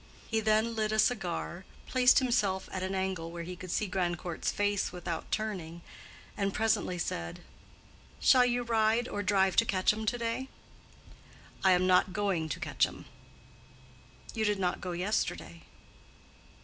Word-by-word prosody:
He 225 - 0
then 220 +1 +2
lit 215 -1 0
a 215 - 0
cigar, 190 -5 0 0.2
placed 255 0 +5
himself 215 -7 +1
at 185 - -4
an 190 +1 -2
angle 190 -3 -2
where 170 0 -6
he 180 +2 -6
could 185 +1 -9
see 210 - 0
Grandcourt's 175 -3 -2
face 205 -1 0
without 175 -2 -5
turning, 175 -6 -3 0.5
and 200 -1 -1
presently 220 -4 +1
said, 85 - -4 0.8
"Shall 255 -1 +6
you 245 0 +1
ride 230 +1 +2
or 205 - -3
drive 190 -1 +2
to 230 - +6
Quetcham 210 +3 +1
to 245 - +1
day?" 235 +3 -3 1.1
"I 190 -1 +6
am 180 0 +3
not 185 0 +3
going 190 -6 0
to - - -3
Quetcham." - - -1 1.3
"You 220 - -1
did 210 -1 +1
not 180 -2 -1
go 180 -1 -4
yesterday." 190 +5 -2
195 Hz, 150 wpm, -30 LUFS, 180-220 Hz, 1.3 s, Shall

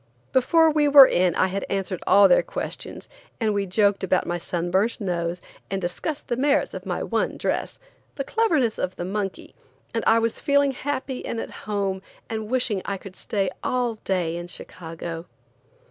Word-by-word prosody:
Before 320 +5 +5
we 300 -1 +3
were 280 -1 +10
in 180 -6 +2
I - - +3
had 195 +1 -2
answered 195 -2 -2
all 200 0 +7
their 180 - +5
questions, - - -6 0.3
and 220 -3 +1
we 200 -1 -1
joked 200 +1 +2
about 185 -1 +2
my 175 0 -2
sun 175 0 -3
burnt 205 +5 +1
nose 175 -3 -2 0.3
and 195 - -1
discussed 190 - -4
the 240 - 0
merits 285 +3 +1
of - - -7
my - - -2
one - - -1
dress, - - -2 0.4
the 275 - -2
cleverness 305 - +1
of 185 0 -2
the 175 - -4
monkey, 195 0 -4 0.4
and 230 - -1
I 225 - +6
was 230 0 0
feeling 285 -1 +3
happy 265 -1 -4
and 230 - -3
at - - -5 0.2
home 195 -2 -1 0.3
and 220 -1 -4
wishing 245 -6 0
I 200 - -3
could 190 0 -11
stay 195 -3 -1
all 245 -2 0
day 175 -3 -1
in 175 0 -6
Chicago. 165 -1 -7
200 Hz, 180 wpm, -24 LUFS, 185-250 Hz, 0.4 s, were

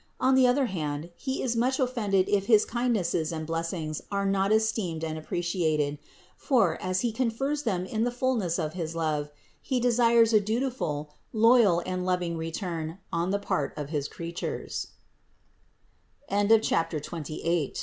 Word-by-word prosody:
On 260 +1 +3
the 260 -1 +6
other 260 +2 +3
hand, 155 -5 -4
He 265 -1 -3
is 240 -2 0
much 255 +4 +1
offended 215 -7 +1
if 200 -1 +1
his 215 -3 +5
kindnesses 215 -10 0
and 160 -1 -4
blessings 165 -1 -3
are 200 0 0
not 195 0 +1
esteemed 215 -7 +1
and 160 -1 -2
appreciated; 155 -3 -1 0.4
for, 255 -5 +2
as 185 0 0
He 240 - 0
confers 260 +5 -1
them 190 -8 -1
in 220 +3 -1
the 245 - +2
fullness 240 -8 0
of 155 -3 -2
his 165 -2 -4
love, 155 -3 -1 0.3
He 260 -2 -1
desires 235 -1 +4
a 215 - +7
dutiful, 210 - -2 0.2
loyal 225 -6 +5
and 185 0 -2
loving 180 -2 0
return 165 0 -4 0.2
on 170 +2 0
the 200 - +1
part 150 -8 -2
of 150 0 -5
195 Hz, 140 wpm, -27 LUFS, 165-235 Hz, 0.4 s, a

